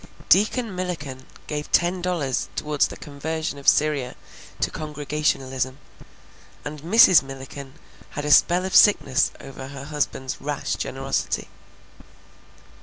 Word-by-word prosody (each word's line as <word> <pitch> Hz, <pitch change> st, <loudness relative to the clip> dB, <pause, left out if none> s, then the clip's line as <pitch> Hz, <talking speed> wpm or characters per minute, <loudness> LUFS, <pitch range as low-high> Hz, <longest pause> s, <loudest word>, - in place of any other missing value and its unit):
Deacon 215 Hz, +1 st, +3 dB
Milliken 150 Hz, -8 st, -5 dB, 0.2 s
gave 150 Hz, 0 st, -5 dB
ten 175 Hz, +1 st, +2 dB
dollars 170 Hz, -8 st, -1 dB
towards 150 Hz, -1 st, +1 dB
the -, -, -10 dB
conversion 150 Hz, +1 st, -4 dB
of 140 Hz, -, -12 dB
Syria 145 Hz, -4 st, +2 dB, 0.4 s
to -, -, 0 dB
Congregationalism, 145 Hz, -4 st, -2 dB, 0.9 s
and 145 Hz, 0 st, -6 dB
Mrs. 185 Hz, 0 st, +7 dB
Milliken 135 Hz, 0 st, -9 dB, 0.4 s
had 145 Hz, -, -3 dB
a 150 Hz, -, 0 dB
spell 175 Hz, +4 st, +5 dB
of 190 Hz, -, -3 dB
sickness 155 Hz, -8 st, +5 dB
over 135 Hz, -1 st, -9 dB
her 140 Hz, 0 st, -8 dB
husband's 145 Hz, -3 st, -3 dB
rash 145 Hz, -8 st, -3 dB
generosity. 135 Hz, +7 st, -2 dB
145 Hz, 115 wpm, -23 LUFS, 135-160 Hz, 0.9 s, Mrs